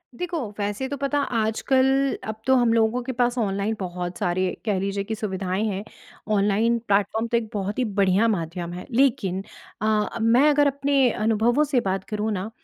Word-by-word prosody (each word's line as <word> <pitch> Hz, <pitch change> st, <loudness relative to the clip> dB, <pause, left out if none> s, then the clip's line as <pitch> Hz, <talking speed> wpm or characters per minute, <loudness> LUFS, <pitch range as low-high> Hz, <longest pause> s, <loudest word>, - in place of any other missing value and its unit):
देखो 350 Hz, +3 st, -3 dB, 0.2 s
वैसे 205 Hz, +6 st, -2 dB
तो 285 Hz, -, -4 dB
पता 280 Hz, +1 st, 0 dB, 0.2 s
आजकल 230 Hz, +4 st, +2 dB, 0.4 s
अब 220 Hz, 0 st, -6 dB
तो 265 Hz, -, +5 dB
हम 240 Hz, -2 st, +3 dB
लोगों 230 Hz, +2 st, +2 dB
के 260 Hz, -, -3 dB
पास 245 Hz, 0 st, 0 dB
ऑनलाइन 200 Hz, 0 st, -1 dB
बहुत 180 Hz, -1 st, -4 dB
सारे 180 Hz, +1 st, 0 dB
कह 205 Hz, -4 st, +1 dB
लीजिए 195 Hz, +1 st, -2 dB
कि 220 Hz, +2 st, -4 dB
सुविधाएँ 190 Hz, -2 st, -2 dB
हैं, 200 Hz, -1 st, -3 dB, 0.5 s
ऑनलाइन 210 Hz, +3 st, +2 dB
प्लेटफ़ॉर्म 205 Hz, +3 st, +1 dB
तो 235 Hz, 0 st, +1 dB
एक 225 Hz, -2 st, -3 dB
बहुत 205 Hz, +2 st, -3 dB
ही -, -, +2 dB, 0.2 s
बढ़िया 195 Hz, +3 st, +4 dB
माध्यम 175 Hz, -3 st, -3 dB
है। 180 Hz, -, -7 dB
लेकिन 225 Hz, -7 st, +1 dB, 0.4 s
अ, 215 Hz, +1 st, 0 dB
मैं 245 Hz, +6 st, +5 dB
अगर 290 Hz, 0 st, +4 dB
अपने 275 Hz, -1 st, +2 dB
अनुभवों 225 Hz, +6 st, +2 dB
से 280 Hz, -4 st, +1 dB
बात 190 Hz, 0 st, -2 dB
करूँ 215 Hz, +1 st, -1 dB
ना 200 Hz, +2 st, -3 dB
220 Hz, 180 wpm, -24 LUFS, 195-245 Hz, 0.5 s, तो